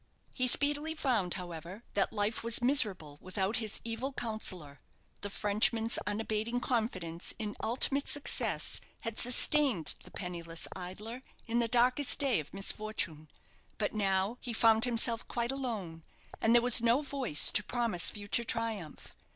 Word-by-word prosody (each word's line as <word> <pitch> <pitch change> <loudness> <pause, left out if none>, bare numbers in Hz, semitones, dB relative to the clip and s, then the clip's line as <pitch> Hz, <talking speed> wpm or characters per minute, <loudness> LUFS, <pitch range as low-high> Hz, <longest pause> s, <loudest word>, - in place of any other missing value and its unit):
He 255 -1 0
speedily 290 +4 +1
found, 230 - 0
however, 175 +3 -8
that 200 - +1
life 210 +1 -2
was 230 0 +2
miserable 205 - +1
without 190 +3 -2
his 220 -2 -2
evil 230 +4 -4
counsellor. 185 - -3 0.4
The 205 - -4
Frenchman's 220 +3 +1
unabating 220 +3 -2
confidence 190 -10 -3
in 210 -2 -5
ultimate 270 +5 +1
success 290 - 0 0.2
had 230 -2 -4
sustained 250 - +4
the - - -11
penniless 170 -3 -6
idler 205 +7 -7 0.3
in 230 +1 0
the 235 - +2
darkest 250 +4 +3
day 275 - +2
of 150 - -8
misfortune. 195 -6 -2 0.5
But 210 - -2
now 195 +2 0
he 240 - -4
found 225 0 +4
himself 235 -1 0
quite 235 0 -2
alone; 215 -12 -5 0.4
and 225 +1 +4
there 240 - +5
was 245 -1 +9
no 235 +5 +3
voice 265 - +2
to 210 - +2
promise 230 -5 +1
future 205 +2 -1
triumph. 225 -9 -5
225 Hz, 145 wpm, -31 LUFS, 190-245 Hz, 0.5 s, was